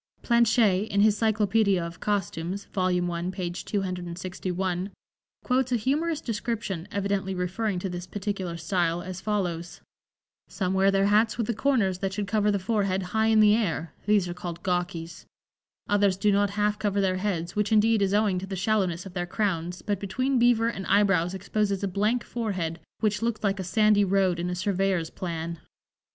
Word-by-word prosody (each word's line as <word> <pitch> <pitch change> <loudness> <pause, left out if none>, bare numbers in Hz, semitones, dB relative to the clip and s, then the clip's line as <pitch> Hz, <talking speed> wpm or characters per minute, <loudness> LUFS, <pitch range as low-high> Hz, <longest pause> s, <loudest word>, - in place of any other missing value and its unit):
Planché, 225 -4 +3
in 200 -1 +1
his 210 0 +4
"Cyclopædia 215 -3 +2
of 170 0 -8
Costumes" 195 -2 -2
(vol. 185 -1 +1
1, 175 0 -2
page 180 -2 -4
261), 185 0 -3 0.5
quotes 255 0 +1
a - - +3
humorous 295 +7 0
description, 210 -6 -3
evidently 200 -1 -1
referring 185 +3 -1
to 180 - -3
this 180 0 -6
particular 190 -3 -4
style, 175 -1 0
as 185 0 -6
follows: 175 -5 -2 0.7
"Some 185 -2 -2
wear 190 +1 +4
their 195 0 +3
hats 215 +2 +3
with 230 - 0
the 235 - -1
corners 220 -6 +1
that 195 0 -2
should 205 +1 -2
cover 210 +1 +1
the 205 - +2
forehead 195 -1 0
high 220 0 +3
in 220 -1 +5
the 210 0 +6
air, 170 -7 -1
these 205 -3 +3
are 175 - -4
called 175 -1 -7
Gawkies; 175 -2 -3 0.6
others 205 -2 +2
do 205 +2 +2
not 200 0 +2
half 210 0 +1
cover 205 -1 0
their 185 -1 +1
heads, 180 -4 -2
which, 210 0 0
indeed, 220 0 +4
is 195 -1 +2
owing 205 -3 +2
to 190 - -7
the 195 - -4
shallowness 190 -3 0
of 190 - -9
their 175 -1 -3
crowns, 180 -3 -2
but 205 -3 -1
between 255 +7 0
beaver 235 -1 +4
and 195 -5 -4
eyebrows 195 -3 +3
exposes 200 0 -1
a - - +1
blank 210 +6 0
forehead, 185 -8 -3 0.2
which 210 -1 +1
looks 230 -2 -1
like 195 -1 +1
a - - -2
sandy 210 +3 +3
road 190 -2 +2
in 175 +1 -2
a 180 - -2
surveyor's 190 -2 0
plan." 170 -2 -5
195 Hz, 180 wpm, -26 LUFS, 180-210 Hz, 0.7 s, the